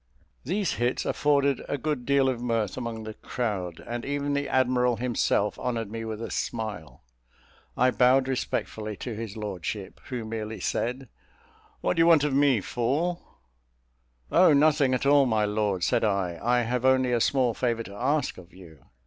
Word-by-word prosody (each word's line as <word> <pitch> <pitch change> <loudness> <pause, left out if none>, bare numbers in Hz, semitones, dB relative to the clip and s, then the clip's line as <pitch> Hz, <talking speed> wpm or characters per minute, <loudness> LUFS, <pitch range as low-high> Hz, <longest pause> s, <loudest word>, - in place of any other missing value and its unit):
These 190 +6 -1
hits 120 +1 0
afforded 140 -2 +1
a 145 - -1
good 145 -5 -3
deal 140 -1 +3
of 125 -3 -1
mirth 115 -5 -1
among 115 -3 -5
the 110 0 -6
crowd, 100 -9 -4
and 120 0 -4
even 145 0 -2
the 140 0 -1
admiral 125 -1 +2
himself 110 -3 0
honoured 115 -4 -3
me 115 0 -5
with 110 0 -5
a - - -5
smile. 110 - -4 0.7
I 125 0 +4
bowed 130 +1 +4
respectfully 110 -5 -3
to 120 - -5
his 110 -1 -6
lordship, 100 -1 -5
who 125 -4 -5
merely 110 0 -5
said 125 +3 -2 0.7
"What - - 0
do - - +4
you 165 - +5
want 160 -4 +6
of 150 -2 0
me, 135 -5 +3
fool?" 145 - -1 1.1
"Oh, 180 -3 +6
nothing 145 -2 +4
at 130 - -2
all, 140 -1 +5
my 110 -3 +2
lord," 105 -3 -1
said - - +2
I, 95 -5 0
"I 120 +1 +2
have 120 +1 -2
only 130 -1 +3
a 120 -1 +1
small 125 -1 +2
favour 115 -1 -1
to 100 - -11
ask 135 +5 -1
of 90 0 -15
you." 85 -5 -15
120 Hz, 175 wpm, -27 LUFS, 110-135 Hz, 1.1 s, want